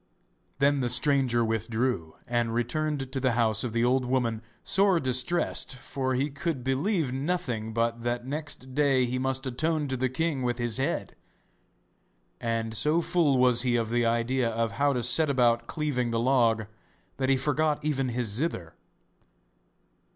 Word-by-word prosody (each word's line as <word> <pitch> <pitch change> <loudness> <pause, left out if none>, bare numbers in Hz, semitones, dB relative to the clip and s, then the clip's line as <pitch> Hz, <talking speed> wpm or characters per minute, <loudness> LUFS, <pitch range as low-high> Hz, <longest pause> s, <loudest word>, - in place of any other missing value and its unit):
Then 140 +1 +3
the 125 -2 0
stranger 125 -2 +2
withdrew, 110 -5 -1
and 120 -1 -1
returned 135 +3 -2
to 135 - -2
the 130 -2 +1
house 110 -2 +1
of 125 - -3
the 115 +1 +1
old 130 +1 +2
woman 125 -3 -1 0.2
sore 195 -3 +3
distressed, 130 +2 0
for 130 0 -3
he 140 +3 -1
could 140 -1 -3
believe 135 - 0
nothing 130 -7 -2
but 115 +1 -1
that 120 0 -2
next 145 -2 -5
day 135 -3 +3
he 125 +1 -2
must 130 +1 -1
atone 150 +4 0
to 130 - -1
the 130 0 0
king 150 +1 -1
with 120 -1 -1
his 120 -3 -1
head. 135 - -2 1.2
And 115 -1 -2
so 150 +8 +2
full 165 -5 +2
was 125 -1 +4
he 125 -1 +1
of 115 -1 -1
the 120 0 +2
idea 120 +1 +1
of 115 -1 -1
how 140 +8 +1
to 125 -2 -1
set 145 +6 +4
about 120 -3 +2
cleaving 140 -6 -1
the 115 0 -1
log 115 -3 +2 0.5
that 130 -1 0
he 135 - +4
forgot 150 +2 0
even 135 -4 0
his 120 0 -1
zither. 100 - -2
130 Hz, 165 wpm, -27 LUFS, 120-140 Hz, 1.2 s, was